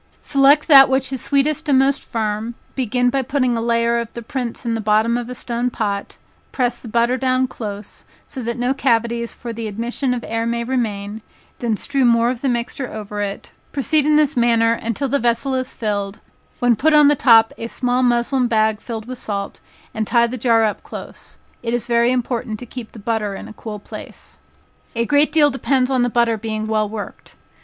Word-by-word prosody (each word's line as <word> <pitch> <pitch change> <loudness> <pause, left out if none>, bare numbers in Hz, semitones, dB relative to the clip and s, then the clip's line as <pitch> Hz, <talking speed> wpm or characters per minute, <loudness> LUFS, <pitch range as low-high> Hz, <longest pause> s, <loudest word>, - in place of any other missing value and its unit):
"Select 285 +1 +4
that 270 -3 +9
which 265 0 +1
is 260 - -2
sweetest 285 +2 0
and 275 - +5
most 270 +1 +2
firm, 220 +1 -3 0.2
begin 245 -1 0
by 270 - +1
putting 255 -2 0
a 230 - -1
layer 235 0 +1
of 235 -1 -5
the 235 - -7
prints 245 0 -4
in 230 - 0
the 225 - -2
bottom 215 +2 +2
of 240 0 -3
a 250 - -5
stone 240 +1 -2
pot, 200 -4 -3 0.3
press 245 -2 -1
the - - -10
butter 235 +3 +1
down 255 0 +1
close, 210 -4 -7 0.2
so 265 - -7
that 235 0 -3
no 245 +2 +1
cavities 235 -3 0
for 235 -2 -7
the 225 0 -5
admission 240 +5 -2
of 240 - -5
air 225 +1 -2
may 235 0 -1
remain, 220 -4 -3 0.4
then 230 -3 -1
strew 275 +3 0
more 235 0 +4
of 250 -1 -6
the 275 - 0
mixture 245 +2 -3
over 210 -1 -5
it, 200 -1 -5 0.2
proceed 295 +2 +2
in 305 - +4
this 300 -1 +3
manner 230 -1 +3
until 230 +4 -2
the 280 +2 0
vessel 240 +3 0
is 255 0 -3
filled, 205 -2 -3 0.4
when 245 -1 +3
put 305 +9 +2
on 300 -1 +7
the 295 - +4
top 225 -4 +5
a 230 - -4
small 250 +1 0
muslin 245 +1 +2
bag 220 -2 +1
filled 225 -2 -6
with 255 0 -7
salt, 200 -3 -5 0.3
and 220 -1 -2
tie 235 -1 +4
the 235 +2 -4
jar 230 -2 +3
up 215 -1 -1
close. - - -9 0.2
It 235 0 -1
is 240 -1 -2
very 235 0 +2
important 235 -3 -2
to 245 - -9
keep 240 -1 -9
the - - -11
butter 215 -1 -2
in - - -8
a - - -10
cool 215 -1 -7
place." 205 - -10 0.6
A 230 0 0
great 290 +4 +3
deal 295 -2 +4
depends 270 -1 0
on 260 -2 +2
the 245 - +2
butter 235 -1 +2
being 215 0 -3
well 215 -1 0
worked. 210 -1 -8
235 Hz, 210 wpm, -20 LUFS, 225-255 Hz, 0.6 s, that